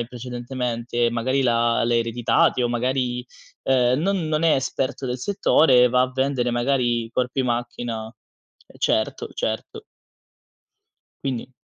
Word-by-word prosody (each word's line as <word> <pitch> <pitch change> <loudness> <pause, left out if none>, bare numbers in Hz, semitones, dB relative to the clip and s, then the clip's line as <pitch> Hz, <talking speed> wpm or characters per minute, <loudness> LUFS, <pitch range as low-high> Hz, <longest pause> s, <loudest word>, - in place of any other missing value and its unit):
in 120 - -3
precedentemente, 120 -1 -3
magari 130 +4 0
l'ha 115 -1 +2
l'ha 120 0 +1
ereditati, 115 +2 +2
o 120 - +1
magari, 125 0 -1 0.4
ehm, 130 0 +3
non 185 -2 0
non 155 +1 0
è 160 - +5
esperto 135 +1 -2
del 125 0 -3
settore, 130 - +4
va 125 - +3
a 130 - -1
vendere, 130 -2 0
magari, 120 -1 +1
i 115 - -11
corpi 125 +2 -1
macchina 120 -2 -3
ehm, 110 0 -19
certo, - - 0
certo. 110 0 -4 1.4
Quindi 130 -1 -3
125 Hz, 135 wpm, -23 LUFS, 120-130 Hz, 1.4 s, è